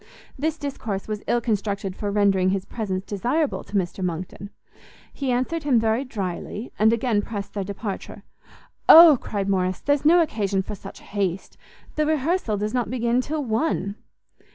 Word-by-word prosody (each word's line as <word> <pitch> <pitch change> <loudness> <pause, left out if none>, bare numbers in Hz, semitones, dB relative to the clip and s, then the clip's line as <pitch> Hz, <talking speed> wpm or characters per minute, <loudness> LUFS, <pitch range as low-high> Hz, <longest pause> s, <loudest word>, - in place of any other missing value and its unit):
This 315 +3 -2
discourse 230 -10 -4
was 210 -1 -4
ill 240 - +2
constructed 200 -4 -2
for 205 - -3
rendering 200 -2 +3
his 190 0 -1
presence 190 -4 -4
desirable 250 - -1
to - - -9
Mr 185 0 -1
Monckton; 180 +3 -4 0.6
he 275 -2 -3
answered 260 +7 -1
him 275 -6 +3
very 225 +3 +1
drily, 205 -1 -5
and 220 +1 +5
again 230 -2 +1
pressed 205 -2 -6
their 200 - -2
departure. 200 +1 -6 0.7
"O," 320 -5 +10
cried 200 -2 -3
Morrice, 185 -2 0
"there's 285 -1 +1
no 335 +4 +6
occasion 200 -9 -1
for 210 - -6
such 200 - -10
haste; 195 -3 -3 0.4
the 305 0 +2
rehearsal 310 - 0
does 210 +2 -2
not 245 -3 0
begin 240 0 +1
till 295 +2 -3
one." 220 -4 -1
215 Hz, 160 wpm, -24 LUFS, 195-260 Hz, 0.7 s, O